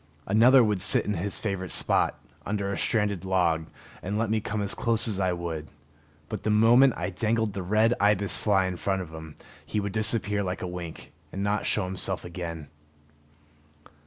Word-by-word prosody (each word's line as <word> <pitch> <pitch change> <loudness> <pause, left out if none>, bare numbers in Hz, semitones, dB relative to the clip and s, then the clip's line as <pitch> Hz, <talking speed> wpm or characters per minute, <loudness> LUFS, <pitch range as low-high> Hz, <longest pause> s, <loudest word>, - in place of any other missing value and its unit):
Another 120 +6 +6
would 105 -4 0
sit - - +4
in 105 - -1
his 95 +2 -3
favorite 95 -3 -3
spot, - - +1 0.2
under 100 -1 -2
a - - -2
stranded 105 -5 0
log, 85 -4 +1 0.3
and 100 +3 -3
let 110 -1 -1
me 110 -1 +1
come 105 -1 -3
as 100 - -2
close 115 -2 0
as 100 -4 -2
I 95 -1 +1
would; 85 -3 -4 0.6
but - - -5
the - - -2
moment 115 +5 +5
I 90 +2 -3
dangled 110 +2 0
the 95 - -4
red 110 +5 +2
ibis 100 -1 +3
fly 95 -3 +2
in 90 -1 -3
front 95 +1 -1
of 80 -2 -12
him, 80 -1 -9 0.3
he 105 - -3
would 100 -1 -3
disappear 110 -1 0
like 90 -1 -4
a - - -3
wink, 90 -2 -8 0.2
and 100 - -4
not 105 +1 -1
show 105 - 0
himself 95 0 -3
again. 85 -4 -6
100 Hz, 190 wpm, -27 LUFS, 90-105 Hz, 0.6 s, Another